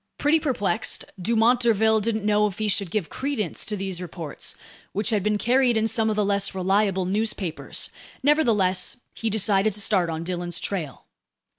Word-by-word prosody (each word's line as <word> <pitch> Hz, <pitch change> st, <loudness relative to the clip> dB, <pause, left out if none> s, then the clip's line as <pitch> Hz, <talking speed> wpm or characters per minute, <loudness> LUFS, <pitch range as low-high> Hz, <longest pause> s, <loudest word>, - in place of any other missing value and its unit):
Pretty 300 Hz, +3 st, +3 dB
perplexed, 225 Hz, -6 st, 0 dB, 0.2 s
Dumont 230 Hz, +5 st, +3 dB
d'Urville 220 Hz, -2 st, +3 dB
didn't 215 Hz, -1 st, -2 dB
know 210 Hz, 0 st, +3 dB
if 200 Hz, -1 st, -7 dB
he 215 Hz, -, -1 dB
should 200 Hz, -2 st, +1 dB
give 195 Hz, -2 st, -2 dB
credence 260 Hz, -, -2 dB
to 210 Hz, -, -4 dB
these 190 Hz, -2 st, -4 dB
reports, 165 Hz, -4 st, -6 dB, 0.4 s
which 210 Hz, +4 st, 0 dB
had 210 Hz, -2 st, +1 dB
been 210 Hz, +2 st, +1 dB
carried 245 Hz, +1 st, +2 dB
in 220 Hz, 0 st, +2 dB
some 225 Hz, 0 st, +1 dB
of 215 Hz, -, 0 dB
the 210 Hz, -1 st, +1 dB
less 200 Hz, -1 st, +1 dB
reliable 190 Hz, 0 st, +1 dB
newspapers; 195 Hz, -3 st, -2 dB, 0.3 s
nevertheless, 220 Hz, -11 st, +2 dB, 0.2 s
he 225 Hz, -, -2 dB
decided 210 Hz, -1 st, +3 dB
to 210 Hz, -, -5 dB
start 190 Hz, -4 st, +2 dB
on 160 Hz, 0 st, -4 dB
Dillon's 175 Hz, -1 st, -2 dB
trail. 160 Hz, -, -5 dB
210 Hz, 170 wpm, -24 LUFS, 190-225 Hz, 0.4 s, Pretty